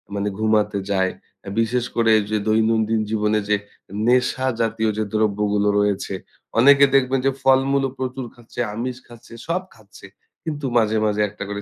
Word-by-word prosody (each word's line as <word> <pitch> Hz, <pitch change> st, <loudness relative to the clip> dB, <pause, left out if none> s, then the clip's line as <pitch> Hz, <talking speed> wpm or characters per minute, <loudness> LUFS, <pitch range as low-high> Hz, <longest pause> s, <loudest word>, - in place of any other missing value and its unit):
মানে 100 Hz, 0 st, -1 dB
ঘুমাতে 105 Hz, -2 st, +1 dB
যায়। 95 Hz, -1 st, +1 dB, 0.5 s
বিশেষ 120 Hz, +2 st, 0 dB
করে 115 Hz, -1 st, +3 dB, 0.2 s
যে 110 Hz, -, +2 dB
দৈনন্দিন 110 Hz, 0 st, +2 dB
জীবনে 105 Hz, 0 st, +1 dB
যে 105 Hz, -, +4 dB, 0.5 s
নেশা 125 Hz, +1 st, +2 dB
জাতীয় 110 Hz, 0 st, 0 dB
যে -, -, +1 dB
দ্রব্যগুলো 105 Hz, -1 st, +1 dB
রয়েছে, 100 Hz, -1 st, -1 dB, 0.5 s
অনেকে 140 Hz, +3 st, +7 dB
দেখবেন 135 Hz, 0 st, +3 dB
যে -, -, +3 dB
ফলমূল 135 Hz, +1 st, +3 dB
ও -, -, -11 dB
প্রচুর 130 Hz, 0 st, -4 dB
খাচ্ছে, 120 Hz, 0 st, -12 dB, 0.2 s
আমিষ 125 Hz, +2 st, -4 dB
খাচ্ছে, 120 Hz, -1 st, -15 dB
সব 175 Hz, +3 st, 0 dB
খাচ্ছে। 105 Hz, -3 st, -16 dB, 0.4 s
কিন্তু 150 Hz, -3 st, -4 dB
মাঝে, 110 Hz, -1 st, +2 dB
মাঝে 105 Hz, 0 st, 0 dB
একটা 100 Hz, 0 st, -8 dB
করে 100 Hz, 0 st, -4 dB
110 Hz, 155 wpm, -21 LUFS, 105-130 Hz, 0.5 s, অনেকে